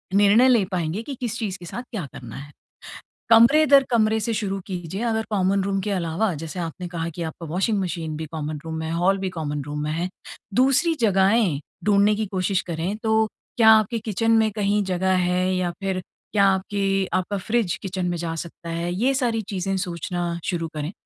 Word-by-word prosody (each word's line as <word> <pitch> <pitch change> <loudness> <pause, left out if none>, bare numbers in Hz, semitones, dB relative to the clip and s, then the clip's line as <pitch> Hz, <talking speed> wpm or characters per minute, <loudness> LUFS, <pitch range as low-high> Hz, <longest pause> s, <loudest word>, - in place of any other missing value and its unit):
निर्णय 205 +5 +6
ले 235 -5 +5
पाएँगे 175 +2 -1
कि 275 +3 -6
किस 235 -2 -2
चीज़ 200 -5 -3
के 175 - -10
साथ 240 +8 -6
क्या 205 -9 -4
करना 120 -3 -9
है। 145 +1 -9 0.8
कमरे 235 +7 +7
दर 275 -1 +7
कमरे 220 -2 +3
से 225 +2 -1
शुरू 200 -3 -2
कीजिए 180 0 -5
अगर 220 -2 0
कॉमन 195 -1 +1
रूम 195 0 0
के 205 - -2
अलावा 180 +2 0
जैसे 165 +3 -6
आपने 175 +1 -5
कहा 170 -1 -3
कि 175 - -6
आपका 165 +2 -10
वाशिंग 195 +6 0
मशीन 165 -4 -3
भी 160 - -4
कॉमन 155 -1 -4
रूम 160 0 -4
में 160 - -3
है, 160 - -3
हॉल 180 +4 +2
भी 190 -1 -2
कॉमन 150 -4 -4
रूम 145 +1 -5
में 150 - -2
है। 170 +3 -2 0.5
दूसरी 270 +7 +4
जगहें 195 -5 +3 0.3
ढूंढने 205 0 +4
की 215 +1 -1
कोशिश 190 0 0
करें 170 +4 -2
तो 220 0 +3 0.3
क्या 225 -2 +7
आपके 220 +1 +2
किचन 225 +1 0
में 220 -1 +3
कहीं 205 0 +1
जगह 185 0 +1
है 180 +1 +1
या 180 -1 0
फ़िर 190 -1 -1 0.3
क्या 200 -2 +4
आपके 195 +1 0 0.3
आपका 185 +2 0
फ्रिज 205 -2 0
किचन 190 -2 -3
में 175 - -2
जा 165 -1 -3
सकता 170 0 -7
है? 170 +1 -2
ये 245 +9 +1
सारी 240 -4 0
चीज़ें 195 0 -2
सोचना 175 -1 -3
शुरू 170 -2 -1
करें। 150 +2 -3
190 Hz, 200 wpm, -23 LUFS, 170-215 Hz, 0.8 s, कमरे